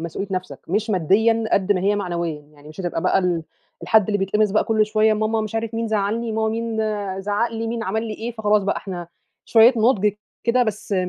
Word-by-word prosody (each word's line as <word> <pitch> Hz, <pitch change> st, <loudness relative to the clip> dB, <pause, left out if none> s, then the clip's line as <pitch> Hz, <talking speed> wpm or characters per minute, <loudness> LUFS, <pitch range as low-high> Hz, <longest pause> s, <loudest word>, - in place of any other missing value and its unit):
مسؤوليّة 170 Hz, +4 st, -5 dB
نَفْسك. 185 Hz, 0 st, -4 dB
مش 215 Hz, +4 st, 0 dB
ماديًا 220 Hz, +6 st, +2 dB
قد 195 Hz, +1 st, +3 dB
ما 185 Hz, -, -1 dB
هي 205 Hz, +2 st, +1 dB
معنويًا، 170 Hz, -5 st, -3 dB
يعني 150 Hz, 0 st, -18 dB
مش 155 Hz, +5 st, -9 dB
هتبقى 175 Hz, -2 st, -3 dB
بقى -, -, +3 dB
ال 180 Hz, -3 st, 0 dB, 0.4 s
الحد 220 Hz, -3 st, +4 dB
اللي 205 Hz, -1 st, 0 dB
بيتقمص 210 Hz, +2 st, +1 dB
بقى 215 Hz, -, +2 dB
كل 215 Hz, -1 st, +2 dB
شويّة، 215 Hz, 0 st, +3 dB
ماما 220 Hz, +1 st, 0 dB
مش 215 Hz, 0 st, -5 dB
عارف 225 Hz, 0 st, -2 dB
مين 230 Hz, 0 st, -2 dB
زعلّني، 220 Hz, +2 st, -1 dB
ماما 220 Hz, 0 st, 0 dB
مين 230 Hz, 0 st, -3 dB, 0.4 s
زعّق 205 Hz, +4 st, 0 dB
لي، 225 Hz, 0 st, -3 dB
مين 230 Hz, 0 st, -3 dB
عمل 220 Hz, +2 st, -2 dB
لي 215 Hz, -, -4 dB
إيه، 230 Hz, +3 st, -5 dB
فخلاص 210 Hz, -2 st, +1 dB
بقى 200 Hz, -, -1 dB
إحنا 175 Hz, -3 st, -6 dB, 0.4 s
شويّة 230 Hz, +2 st, +6 dB
نضج 215 Hz, -3 st, +3 dB, 0.3 s
كده 245 Hz, +1 st, +3 dB
بس 215 Hz, -2 st, -3 dB
210 Hz, 210 wpm, -22 LUFS, 190-225 Hz, 0.4 s, شويّة